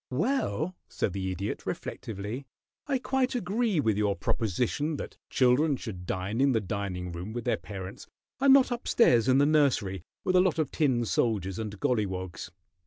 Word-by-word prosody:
"Well," 185 - 0
said 95 - -1
the 95 -1 -2
Idiot, 95 +3 -4
reflectively, 110 +6 -5 0.4
"I 275 -2 +2
quite 260 0 0
agree 215 -3 0
with 110 -6 +1
your 100 -1 +2
proposition 125 - -1
that - - -7
children 135 +3 +3
should 90 -7 -7
dine 100 +6 -2
in 140 -1 +4
the 115 - +3
dining 95 -3 -4
room 90 +5 -6
with 120 -1 -4
their - - +2
parents 95 -2 -8 0.3
and 275 0 +5
not 270 -2 +6
up 240 0 -3
stairs 120 - +4
in 130 0 +5
the 140 - +5
nursery, 135 - +2 0.2
with 185 - +1
a 180 - +7
lot 180 -4 +2
of 155 -3 0
tin 130 -7 +1
soldiers 100 -5 0
and 105 -2 -5
golliwogs. 95 -7 -2
120 Hz, 175 wpm, -28 LUFS, 100-155 Hz, 0.4 s, a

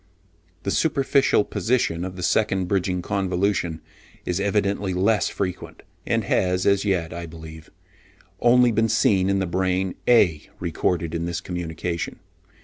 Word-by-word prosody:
The 100 - -1
superficial 140 -6 +2
position 110 -10 -1
of 90 0 -5
the 90 - -6
second 95 0 +1
bridging 90 -1 -1
convolution 95 -4 -1 0.4
is 90 +1 -1
evidently 100 -1 0
less 100 +4 +2
frequent, 90 -3 -5 0.2
and - - +1
has 90 0 +1
as 100 -1 +3
yet, 90 -6 -1
I 85 0 -6
believe, 80 0 -11 0.7
only 125 0 +5
been 115 +1 +1
seen 95 -3 +3
in 100 - +2
the 95 - 0
brain 95 +1 0
(A) 90 -11 +3
recorded 85 -1 -1
in 85 0 -2
this 85 -1 -3
communication. 85 -1 -4
95 Hz, 140 wpm, -23 LUFS, 85-100 Hz, 0.7 s, only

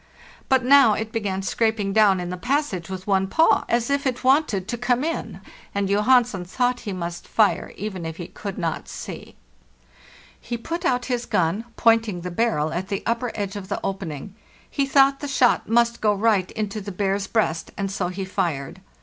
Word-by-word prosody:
But 260 -2 +3
now 275 -4 +7
it 220 +1 -3
began 195 -4 -2
scraping 215 -1 0
down 205 -3 +5
in 180 0 -4
the - - -3
passage 240 - -1
with 185 -1 -6
one 195 -1 +2
paw,'as 240 -3 +2
if 280 0 +1
it 255 -1 -2
wanted 255 - +2
to - - -2
come 245 +2 0
in, 330 +1 -4 0.3
and 200 -1 0
Johansen 210 0 +3
thought 245 +7 0
he - - -2
must 175 -2 -5
fire, 215 -3 +2
even 190 -4 -5
if 160 0 -5
he 175 - -6
could 200 -2 -7
not 165 -3 -3
see. - - -8 1.0
He 235 - -5
put 335 +9 -5
out 250 -5 +1
his 245 -2 -2
gun, 180 +6 0
pointing 225 -5 +3
the 180 +1 -5
barrel 175 -7 0
at 180 +3 -3
the 200 0 -3
upper 235 +1 -1
edge 200 -2 -3
of 200 -2 -6
the - - -2
opening; 190 -3 -5 0.3
he 275 -1 -1
thought 275 0 +4
the 290 - -5
shot 255 -5 +2
must 235 0 +2
go 210 -1 +3
right 200 -3 +2
into 215 0 -3
the 200 +1 -6
bear's 195 +1 -1
breast, 170 -8 0
and 195 -1 -2
so 190 -2 -1
he 185 +2 -4
fired. 150 -7 -3
210 Hz, 190 wpm, -23 LUFS, 190-245 Hz, 1.0 s, now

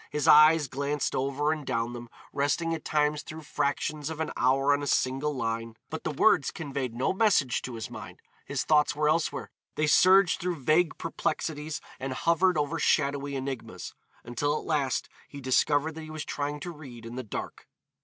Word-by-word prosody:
His 150 -2 -2
eyes 155 0 +7
glanced 140 +2 -2
over 140 +3 0
and 155 -1 -3
down 120 -3 -2
them, 120 -1 -8 0.2
resting 145 +4 0
at 165 - -5
times 150 -1 +1
through 155 +1 -9
fractions 150 +1 -2
of 160 -1 -6
an 160 - -2
hour 135 +3 +3
on 145 - 0
a 145 - -3
single 135 +3 +1
line, 115 -3 -3
but - - -5
the - - -1
words - - +3
conveyed 135 -6 -4
no 130 +8 0
message 190 - +2
to 125 - -6
his 110 -1 -6
mind, - - -9 0.2
his - - -2
thoughts 150 -1 +3
were 150 0 +1
elsewhere, 160 +1 -1 0.2
they 155 - +1
surged 185 +4 +5
through 180 0 -1
vague 155 +3 +3
perplexities 155 -2 -3 0.2
and 130 0 -3
hovered 170 +4 +2
over 150 +2 -1
shadowy 140 -2 +1
enigmas, 135 -2 -5 0.3
until 145 +5 -1
at - - -7
last 140 -5 0 0.2
he 140 - -10
discovered 145 +3 +2
that 160 - -8
he 155 - -9
was 155 -1 -5
trying 145 0 -3
to 175 - -5
read 130 -8 -11
in 115 - -8
the 130 - -4
dark. 110 - -7
145 Hz, 185 wpm, -28 LUFS, 135-155 Hz, 0.3 s, eyes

